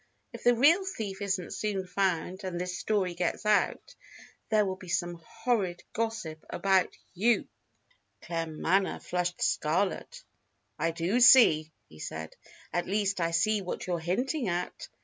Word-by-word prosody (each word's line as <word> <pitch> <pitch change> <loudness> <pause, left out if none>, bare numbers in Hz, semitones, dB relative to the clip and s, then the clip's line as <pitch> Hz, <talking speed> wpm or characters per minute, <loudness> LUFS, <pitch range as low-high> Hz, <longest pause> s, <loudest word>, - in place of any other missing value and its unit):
If - - -9
the 245 0 +6
real 315 +10 +5
thief 210 - -5
isn't 190 -3 -2
soon 200 -3 -2
found, 185 0 -1
and 180 -2 -4
this 180 0 -3
story 185 0 0
gets 175 +4 -2
out, 210 0 +1 0.6
there 215 -2 +3
will 190 -1 -2
be 185 -1 -13
some 175 -1 -2
horrid 220 -5 -1
gossip 220 -9 -3
about 190 -2 +1 0.2
you." 225 +6 +2 0.8
Claremanagh 165 +3 -1
flushed 180 0 -2
scarlet. 195 - -1 0.6
"I 165 - +1
do 170 +8 0
see," 160 -11 +7 0.2
he 80 -3 -16
said. 80 +1 -6 0.4
"At 175 - -1
least, 200 -2 0
I 165 - +1
see 200 +6 +2
what 180 - -5
you're 175 -2 -1
hinting 245 - -1
at. 175 0 -3
185 Hz, 145 wpm, -29 LUFS, 175-215 Hz, 0.8 s, see